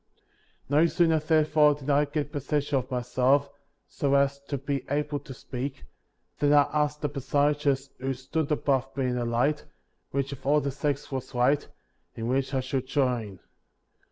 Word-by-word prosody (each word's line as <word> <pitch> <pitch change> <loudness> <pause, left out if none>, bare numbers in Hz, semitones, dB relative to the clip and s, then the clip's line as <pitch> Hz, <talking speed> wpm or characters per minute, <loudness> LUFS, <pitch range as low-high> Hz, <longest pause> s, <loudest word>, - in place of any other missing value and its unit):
No 150 +4 +4
sooner, 165 -1 +3
therefore, 155 -1 +4
did 145 0 -3
I 145 +1 +4
get 145 0 -3
possession 145 -1 -1
of 130 0 -7
myself, 130 +3 +1 0.4
so 140 -1 0
as 140 0 +2
to 140 - -3
be 135 0 -3
able 145 +1 -1
to 140 - -12
speak, 130 +1 -6 0.5
than 145 0 +3
I 145 -1 +7
asked 150 0 0
the 150 - +1
personages 140 0 0
who 135 +1 -2
stood 145 +4 -3
above 135 -2 0
me 135 - +1
in 125 -1 0
the 120 -1 -1
light, 125 +6 +1 0.5
which 140 0 -2
of 140 - -8
all 145 +2 +4
the 140 -1 -2
sects 140 +1 -2
was 130 -2 -5
right 130 +4 +2 0.2
— - - -45
and 115 0 -4
which 135 +1 0
I 135 -2 0
should 130 0 -3
join. 120 - -1
140 Hz, 175 wpm, -27 LUFS, 130-150 Hz, 0.5 s, I